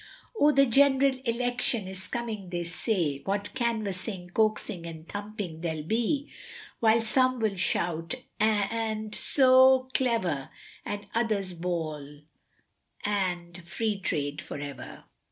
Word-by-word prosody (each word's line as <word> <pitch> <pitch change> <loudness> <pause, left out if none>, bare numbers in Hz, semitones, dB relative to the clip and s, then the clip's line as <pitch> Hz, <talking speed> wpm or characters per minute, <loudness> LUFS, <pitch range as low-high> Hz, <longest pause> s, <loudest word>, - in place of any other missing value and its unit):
O 295 - +6
the 275 -1 +5
general 270 +1 +4
Election 235 -3 +1
is 190 0 -6
coming 220 -6 -4
they 175 -1 -2
say, 170 - -1
What 200 +5 -3
canvassing, 210 -6 -2
coaxing, 215 -4 0
and 160 0 -9
thumping 205 -5 -6
there'll 160 -3 -3
be, 235 - 0 0.5
While 225 0 +4
some 255 +3 +2
will 215 -3 0
shout 170 +1 -1 0.2
and 215 0 0
so 260 0 +5
clever, 185 - 0 0.3
And 205 0 -5
others 215 -5 0
bawl 155 -4 -4 0.8
and 180 -4 -1
free 210 +3 -2
trade 145 -4 -2
for - - -7
ever. 140 -2 -8
205 Hz, 120 wpm, -28 LUFS, 175-235 Hz, 0.8 s, O